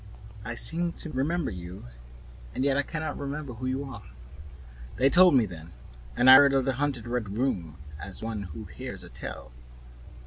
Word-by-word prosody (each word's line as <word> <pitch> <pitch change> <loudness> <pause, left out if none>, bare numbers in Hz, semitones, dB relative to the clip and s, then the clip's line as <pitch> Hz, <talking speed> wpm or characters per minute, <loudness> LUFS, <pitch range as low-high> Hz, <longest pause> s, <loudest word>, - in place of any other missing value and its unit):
"I 120 +2 -5
seem 170 +7 -2
to 160 - -8
remember 150 +5 -1
you, 90 -1 -8 0.7
and 130 - 0
yet 140 -1 +3
I 140 - +3
can 155 +2 -5
not 155 - -4
remember 140 -1 -4
who 125 +3 -5
you 130 +2 -1
are." 130 -7 -8 0.9
They 135 +2 +3
told 180 -4 +7
me 120 -4 +5
then, 85 -3 -10 0.4
and 125 - +4
I 130 0 +12
heard 140 0 +6
of 135 -1 +2
the 135 - +1
haunted 135 -3 -2
Red 120 -3 -2
Room 90 - -1 0.2
as 95 +5 -8
one 110 -2 -3
who 95 - -8
hears - - -8
a - - -11
tale. - - -8
130 Hz, 185 wpm, -28 LUFS, 110-140 Hz, 0.9 s, I